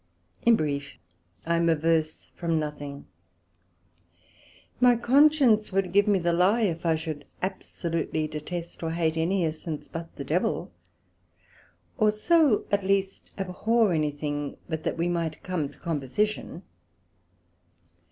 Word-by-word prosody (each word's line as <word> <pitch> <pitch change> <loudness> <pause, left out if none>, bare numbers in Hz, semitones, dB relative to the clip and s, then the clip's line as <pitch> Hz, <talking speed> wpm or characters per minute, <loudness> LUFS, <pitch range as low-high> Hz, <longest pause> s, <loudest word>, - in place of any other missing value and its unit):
In 235 - +5
brief, 145 -4 -3 0.5
I 170 0 +1
am 170 0 +2
averse 160 0 0
from 165 -2 -1
nothing; 145 -2 -5 1.7
my 245 -1 +6
Conscience 255 -3 +4
would 190 -1 0
give 200 +1 +4
me 205 -2 +4
the 170 -1 +1
lye 190 +7 +3
if 170 -4 -1
I 165 - +4
should 155 -2 -5 0.2
absolutely 165 -4 -2
detest 165 +3 -6
or 165 - -2
hate 165 -1 0
any 170 +3 +1
essence 155 -1 -5
but 165 0 -8
the - - -5
Devil; - - -1 1.3
or 215 -1 +5
so 280 +3 +3
at 200 -1 +2
least 195 0 -1
abhor 205 +2 +1
any 155 -2 +1
thing, 145 -1 -4
but 160 -2 -3
that - - -1
we 170 +1 0
might 170 -3 -2
come 175 -6 -2
to - - -18
composition. 170 +5 -2
170 Hz, 130 wpm, -27 LUFS, 155-200 Hz, 1.7 s, my